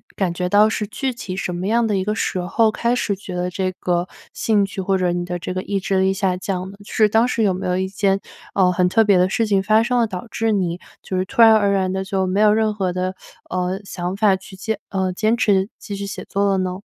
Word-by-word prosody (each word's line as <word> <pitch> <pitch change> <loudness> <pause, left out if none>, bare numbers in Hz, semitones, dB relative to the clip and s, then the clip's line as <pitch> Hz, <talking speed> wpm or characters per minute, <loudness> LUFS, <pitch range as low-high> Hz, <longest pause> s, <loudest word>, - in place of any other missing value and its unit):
感 185 -3 0
觉 180 +1 -2
到 205 +3 +5
是 210 -2 -2
具 265 +3 -3
体 200 -6 -6
什 180 - -3
么 180 +2 -3
样 230 +2 +2
的 215 -2 0
一 190 - 0
个 210 +1 -1
时 185 - -1
候， 215 +5 +2
开 235 +2 0
始 220 -4 0
觉 185 -2 -8
得 180 0 -1
这 185 0 -1
个 175 0 0 0.3
兴 210 -3 +2
趣， 195 - -8
或 190 +1 +1
者 180 -1 +1
你 175 0 -2
的 175 0 -3
这 180 +1 -5
个 185 - -2
意 200 +1 -2
志 190 0 0
力 190 0 +3
下 190 -2 0
降 185 0 -4
的， 200 - -14
就 - - -12
是 215 - +4
当 225 +3 +3
时 230 -2 0
有 195 -3 +3
没 185 - -4
有 180 0 0
一 190 0 -1
件， 195 0 +1 0.4
呃， 185 -2 +4
很 180 0 +2
特 225 +4 +4
别 200 -3 +4
的 180 - +4
事 225 +3 +1
情 200 -2 +2
发 215 +3 +3
生 245 +1 +1
了， 230 - +2
导 190 +2 -6
致 225 0 0
你 180 -3 -1 0.2
就 190 - -4
是 185 - 0
突 215 - 0
然 225 -1 +8
而 205 -2 +3
然 190 -1 +1
的 190 0 -2
就 190 -1 -1
没 185 +2 0
有 210 -1 +6
任 215 0 +1
何 190 -3 -1
的， 185 +1 -2 0.4
呃， 185 +1 -2
想 180 -1 -4
法 205 -2 +4
去 190 0 -13
坚 210 +2 -3
呃， 190 -1 -1
坚 215 +4 +1
持 195 -3 +2
继 205 - -7
续 200 0 -5
写 - - -6
作 200 0 0
了 195 - +2
呢？ 185 0 -2
195 Hz, 295 characters per minute, -21 LUFS, 185-215 Hz, 0.4 s, 然